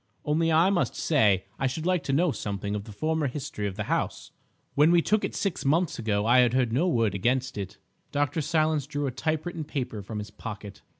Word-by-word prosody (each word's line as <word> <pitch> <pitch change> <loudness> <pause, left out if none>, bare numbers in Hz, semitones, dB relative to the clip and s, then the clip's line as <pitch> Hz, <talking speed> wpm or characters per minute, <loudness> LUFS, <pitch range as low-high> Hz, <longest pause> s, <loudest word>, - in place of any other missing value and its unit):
Only 160 +2 +2
I 165 +5 +5
must 180 -3 0
say 105 - +2
I 135 - +2
should 155 +5 -4
like 180 -2 +2
to - - -1
know 160 +4 +3
something 100 -4 -4
of 105 -1 -3
the 110 - -10
former 155 +7 0
history 125 -6 -4
of 95 - -5
the 105 - -3
house. - - -2 0.4
When 150 +3 +5
we 175 0 +5
took 215 0 +2
it - - -3
six 195 -4 -2
months 160 +3 +1
ago 105 -2 0
I 125 +1 +5
heard 125 -2 +1
no 155 +9 +2
word 115 - +2
against 125 +6 0
it." 100 -2 -6 0.3
Dr. 145 +3 0
Silence 155 -2 +1
drew 145 -1 -2
a 135 - -1
typewritten 155 +5 -2
paper 130 -7 -4
from 105 +2 -6
his 105 0 -6
pocket. 105 -2 -8
135 Hz, 215 wpm, -27 LUFS, 110-160 Hz, 0.4 s, I